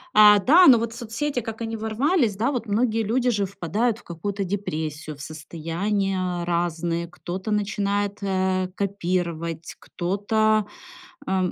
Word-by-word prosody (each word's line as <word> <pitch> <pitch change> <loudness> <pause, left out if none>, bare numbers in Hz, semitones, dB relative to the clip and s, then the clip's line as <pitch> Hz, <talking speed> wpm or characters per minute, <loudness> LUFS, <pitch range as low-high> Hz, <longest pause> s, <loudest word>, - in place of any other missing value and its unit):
А, 210 -1 +8
да, 330 - +7
но 255 - +9
вот 230 0 -2
соцсети, 240 +4 -3
как 225 -1 -6
они 225 0 -3
ворвались, 225 - +1
да, 230 +7 0
вот 245 -4 -3
многие 225 +2 +1
люди 245 +4 +1
же 205 -4 +1
впадают 200 +5 -1
в - - -19
какую-то 195 +4 -4
депрессию, 160 -6 -4
в 140 - -12
состояния 175 +4 -2
разные. 170 0 -1
Кто-то 185 +4 -6
начинает, 205 -1 0
э, 190 -1 0
копировать, 170 -4 -2
кто-то, 215 +4 +1 0.6
э 185 -1 +1
200 Hz, 135 wpm, -24 LUFS, 175-220 Hz, 0.6 s, но